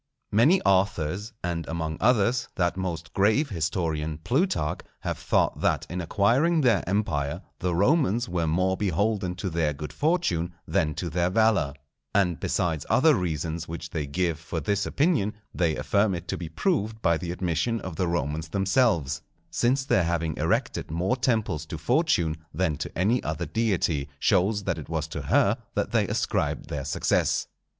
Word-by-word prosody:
Many 145 - +4
authors, 95 +1 +1
and 85 -1 -2
among 80 -1 -3
others 120 +1 +2
that 85 -1 +1
most 85 -4 -4
grave 110 +10 +3
historian 80 -3 -2
Plutarch, 125 - 0 0.2
have - - -3
thought - - +1
that - - +1
in 90 0 -2
acquiring 125 - +2
their 115 - +3
empire 80 -9 -1 0.2
the 90 -1 0
Romans 120 - +2
were 85 -2 -1
more 95 +4 +1
beholden 100 0 0
to 95 - -4
their 80 -4 0
good 75 +1 -7
fortune 120 - 0
than 75 -2 +1
to 85 -3 -4
their 90 +2 +1
valour; 95 -8 +2 0.4
and 90 -4 +2
besides 80 -4 -1
other 155 +4 +5
reasons 85 - -2
which 85 0 -6
they 80 -5 -3
give 85 +2 -1
for 80 0 -4
this 100 +6 0
opinion, 140 - +1 0.2
they 85 -3 +1
affirm 100 -1 +1
it 85 0 -7
to - - -1
be 85 -2 -6
proved 110 - -1
by 85 - +4
the 85 +1 -4
admission 90 +5 -1
of 90 -4 -6
the 90 +2 0
Romans 80 -1 -2
themselves, 95 - +1 0.3
since 130 +3 +1
their 95 -10 +3
having 80 -2 -1
erected - - 0
more 90 +9 0
temples 110 - 0
to - - -5
Fortune 80 -2 +1
than 80 -1 0
to 75 - -6
any 110 +8 +2
other - - -3
deity, 90 -10 0
shows 100 +5 +2
that - - -1
it - - -9
was - - -2
to - - -4
her - - +3 0.2
that - - -1
they - - +2
ascribed - - -1
their 70 -2 -4
success. - - +1
90 Hz, 165 wpm, -26 LUFS, 80-110 Hz, 0.4 s, other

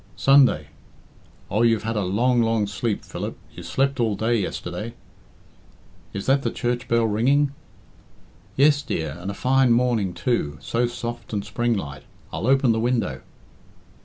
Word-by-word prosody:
"Sunday. 125 - +4 0.8
Oh, 105 - +1
you've 115 -2 +3
had 115 +1 -2
a 105 - +1
long, 120 +7 +2
long 115 -2 +1
sleep, 100 +2 -3
Philip. - - -5 0.2
You - - -9
slept 135 0 0
all 110 -3 +1
day 110 +4 +1
yesterday." 100 +3 -4 1.2
"Is 100 - -5
that 135 +1 +3
the - - -1
church 120 0 -2
bell 115 0 +2
ringing?" 135 +7 +2 1.0
"Yes, 145 +1 +4
dear, 80 - -3
and 90 +3 -5
a 100 - -4
fine 130 +1 +3
morning, 115 -6 +1
too 75 - -1
so 120 - 0
soft 120 -1 -6
and 100 -1 -2
springlike. 105 -10 -2 0.3
I'll - - -2
open 135 -2 +4
the 110 - +1
window." 115 - -1
115 Hz, 150 wpm, -23 LUFS, 100-125 Hz, 1.2 s, Sunday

